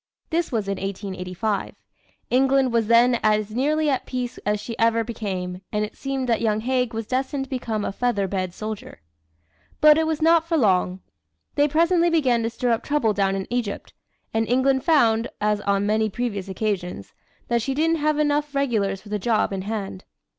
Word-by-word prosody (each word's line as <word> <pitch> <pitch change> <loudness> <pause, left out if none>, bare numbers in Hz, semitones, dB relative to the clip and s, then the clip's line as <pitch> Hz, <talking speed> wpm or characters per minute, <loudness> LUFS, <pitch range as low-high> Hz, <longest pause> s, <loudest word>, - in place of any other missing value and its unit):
This 335 +1 0
was 220 -5 -1
in 195 -1 -2
1885. 195 +1 -3 0.6
England 265 0 +3
was 230 -2 +2
then 235 +1 +5
as 215 0 +1
nearly 300 +6 +1
at 270 -3 0
peace 250 -1 -4
as 210 0 +1
she 230 +2 -6
ever 230 0 +3
became, 190 -5 -4
and 210 0 0
it 210 - -11
seemed 270 -2 -3
that 230 -2 +1
young 215 -2 +1
Haig 250 0 0
was 225 -1 -4
destined 265 +3 -1
to 270 - -11
become 225 -5 -2
a - - -2
feather 205 -2 0
bed 185 -1 -2
soldier. 215 +3 -7 0.8
But 305 0 +7
it 320 - +1
was 315 -1 -1
not 330 0 +4
for 335 -1 +1
long. 185 -6 +2 0.5
They 290 +1 +3
presently 335 +3 +3
began 265 -8 +2
to 225 - -1
stir 240 +1 -1
up 230 - +1
trouble 285 -8 +1
down 195 -1 +1
in 190 -1 -3
Egypt, 240 -5 -3 0.4
and 225 0 +1
England 260 +1 +2
found, 235 -8 +3
as 210 0 +1
on 200 0 +1
many 215 +1 +1
previous 205 -3 -3
occasions, 190 - -3 0.3
that 235 -1 +1
she 265 +4 -2
didn't 325 +3 +2
have 305 0 +1
half 300 - +1
enough 295 0 0
regulars 210 -8 0
for 210 - -13
the 210 0 -2
job 215 0 +1
in 190 - -3
hand. 195 -2 -5
230 Hz, 190 wpm, -23 LUFS, 205-270 Hz, 0.8 s, But